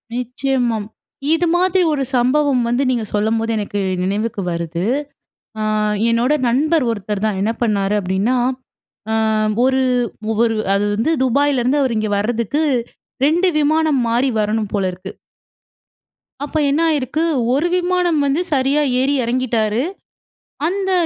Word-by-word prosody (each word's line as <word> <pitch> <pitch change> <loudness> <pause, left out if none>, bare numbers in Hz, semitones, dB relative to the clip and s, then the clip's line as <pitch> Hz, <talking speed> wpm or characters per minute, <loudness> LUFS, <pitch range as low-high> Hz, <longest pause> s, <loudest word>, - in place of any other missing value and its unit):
நிச்சயமாம். 245 -3 -1 0.5
இது 335 +1 +1
மாதிரி 370 +1 +3
1 275 -2 -1
சம்பவம் 255 +2 +2
வந்து 245 +3 +1
நீங்க 240 -3 0
சொல்லும்போது 225 +2 0
எனக்கு 205 -1 -3 0.2
நினைவுக்கு 205 +2 -2
வருது. 170 0 -3 0.8
அ - - -1 0.5
என்னோட 235 +4 +2 0.2
நண்பர் 300 +5 +2
ஒருத்தர் 210 -1 -3
தான். 210 -3 -1
என்ன 215 +3 +1
பண்ணாரு 205 -3 +1
அப்பிடின்னா, 195 +6 0 0.8
அ - - +1 0.5
ஒரு 265 0 +2 0.6
ஒரு 225 -1 0 0.2
அது 200 +1 +1
வந்து 225 +10 0
துபாயிலருந்து 270 +1 +2
அவரு 250 -4 0
இங்க 215 -1 -1
வர்றதுக்கு 235 +7 -1 0.6
2 340 +5 +2
விமானம் 305 -1 +2
மாறி 240 +4 +1
வரணும் 210 0 -1
போல 195 -2 +1
இருக்கு. 180 +1 -9 1.3
அப்ப 295 +2 -3
என்ன 290 +4 +1
ஆயிருக்கு 300 +1 -1 0.3
1 295 +6 +1
விமானம் 355 -3 +1
வந்து 280 +5 +1
சரியா 275 +2 +2 0.2
ஏறி 270 +2 +1
இறங்கிட்டாரு. 235 -2 0 0.9
அந்த 385 +2 -1
250 Hz, 125 wpm, -18 LUFS, 215-290 Hz, 1.3 s, மாதிரி